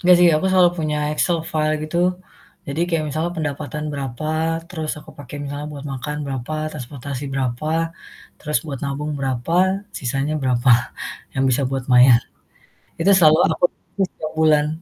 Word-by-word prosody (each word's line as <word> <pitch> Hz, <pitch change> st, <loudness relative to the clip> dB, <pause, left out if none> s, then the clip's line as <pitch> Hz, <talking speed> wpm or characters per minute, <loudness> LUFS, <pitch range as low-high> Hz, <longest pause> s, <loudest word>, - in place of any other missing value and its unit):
Enggak 180 Hz, 0 st, +6 dB
sih 175 Hz, -, +7 dB
aku 190 Hz, -, 0 dB
selalu 180 Hz, -2 st, +6 dB
punya 150 Hz, -1 st, 0 dB, 0.2 s
Excel 170 Hz, +2 st, +1 dB
file 155 Hz, 0 st, +1 dB
gitu, 155 Hz, +2 st, -4 dB, 0.7 s
jadi 140 Hz, +4 st, -3 dB
kayak 165 Hz, -2 st, +1 dB
misalnya 160 Hz, +4 st, -2 dB
pendapatan 150 Hz, 0 st, -3 dB
berapa, 140 Hz, +1 st, -4 dB, 0.4 s
terus 160 Hz, -4 st, -4 dB
aku -, -, -14 dB
pakai 145 Hz, +1 st, -8 dB
misalnya 145 Hz, +1 st, -5 dB
buat 140 Hz, 0 st, -8 dB
makan 150 Hz, +3 st, -4 dB
berapa, 135 Hz, +2 st, -4 dB, 0.2 s
transportasi 140 Hz, -1 st, -6 dB
berapa, 130 Hz, +2 st, -2 dB, 0.7 s
terus 150 Hz, -4 st, 0 dB
buat 140 Hz, -3 st, -4 dB
nabung 145 Hz, +2 st, -3 dB
berapa, 135 Hz, +4 st, -2 dB, 0.4 s
sisanya 135 Hz, +4 st, -1 dB
berapa 125 Hz, -1 st, +2 dB, 0.6 s
yang 135 Hz, -, 0 dB
bisa 130 Hz, +3 st, +2 dB
buat 135 Hz, -2 st, -2 dB
maya. 125 Hz, 0 st, +8 dB, 0.9 s
Itu 195 Hz, +4 st, +4 dB
selalu 155 Hz, -2 st, +6 dB
aku 160 Hz, -, -1 dB, 0.3 s
tulis 195 Hz, -2 st, +1 dB
tiap 155 Hz, 0 st, -4 dB
bulan 150 Hz, -2 st, +4 dB
150 Hz, 155 wpm, -21 LUFS, 135-155 Hz, 0.9 s, maya